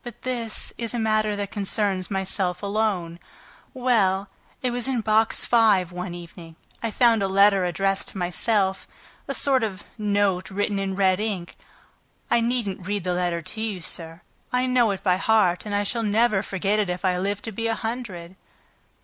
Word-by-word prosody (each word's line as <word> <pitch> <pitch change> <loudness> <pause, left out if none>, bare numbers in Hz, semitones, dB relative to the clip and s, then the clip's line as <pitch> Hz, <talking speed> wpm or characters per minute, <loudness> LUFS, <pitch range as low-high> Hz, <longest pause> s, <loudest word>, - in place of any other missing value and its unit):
"But 240 -2 -10
this 235 -4 -1
is 230 0 -1
a - - 0
matter 215 -1 +1
that 205 -1 -4
concerns 200 -2 -1
myself 190 -1 -1
alone... 200 -5 -1 0.5
Well, 210 -7 +1 0.3
it 250 - +1
was 245 +1 -1
in 255 -3 0
Box 220 +1 +3
Five 210 -7 +4
one 180 0 -5
evening, 170 -1 -11 0.3
I 230 - -1
found 230 0 +3
a 195 - +1
letter 195 0 +4
addressed 195 +2 0
to - - -7
myself, 190 +2 0 0.4
a 275 - -2
sort 265 0 +2
of 200 -3 -3 0.2
note 200 -3 +1
written 205 +1 -1
in 195 -1 -2
red 190 -1 +3
ink. 200 -5 -3 0.8
I - - +5
needn't 230 -6 -2
read 205 -2 -2
the 180 0 0
letter 175 -1 -1
to 220 +7 -5
you 215 -4 -2
sir; 165 0 -5 0.3
I 250 0 +1
know 250 -3 +3
it 195 -1 -3
by 180 -2 +3
heart, 210 -3 +2
and 205 - -2
I 205 - +1
shall 230 +3 -1
never 215 -1 +2
forget 200 +1 -1
it 205 -3 0
if 180 +2 -3
I 180 -1 +2
live 200 +2 -2
to 225 - -4
be 230 +2 -2
a 225 - 0
hundred!" 215 -7 -5
205 Hz, 185 wpm, -24 LUFS, 185-225 Hz, 0.8 s, I